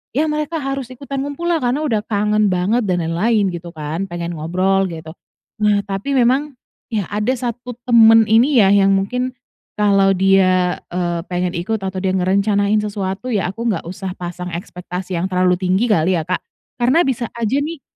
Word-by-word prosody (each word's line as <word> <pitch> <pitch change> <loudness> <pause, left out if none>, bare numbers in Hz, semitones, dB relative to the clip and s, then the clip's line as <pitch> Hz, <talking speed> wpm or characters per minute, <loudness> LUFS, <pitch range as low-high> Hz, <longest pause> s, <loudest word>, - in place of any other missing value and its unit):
ya 295 - +3
mereka 305 0 -3
harus 270 -2 -3
ikutan 270 +2 -6
ngumpul 285 +5 -3
lah 330 - +2
karena 255 +5 -1
udah 225 -8 +1
kangen 210 0 +1
banget 195 +5 +1
dan 175 -2 0
lain-lain 195 +5 +1
gitu 170 -1 -8
kan, 155 +5 -4
pengen 175 -1 -5
ngobrol 185 +4 +1
gitu. 160 -2 -8 0.5
Nah 205 -1 +2
tapi 200 +8 -3
memang 265 +3 +2 0.4
ya 205 -4 -1
ada 210 +5 0
1 245 0 -5 0.2
teman 225 -1 +7
ini 235 +3 +5
ya 195 - +5
yang 195 -1 +4
mungkin 250 +7 -1 0.4
kalau 195 -2 +4
dia, 185 -1 +3 0.2
eee, 175 -1 -1
pengen 180 0 -1
ikut 205 +4 -2
atau 190 0 -4
dia 190 -1 0
ngerencanain 200 +3 +2
sesuatu, 200 +2 -4
ya 190 -3 0
aku 230 +5 -6
nggak 200 - -2
usah 185 0 -5
pasang 180 0 -6
ekspektasi 180 +1 -5
yang 170 - -1
terlalu 180 -1 +2
tinggi 185 +5 +1
kali 185 -3 +2
ya, 165 - 0
Kak, 185 +2 0 0.4
karena 255 +7 +3
bisa 255 -7 -1
aja 235 +3 -1
nih 300 0 -3
200 Hz, 175 wpm, -19 LUFS, 180-240 Hz, 0.5 s, teman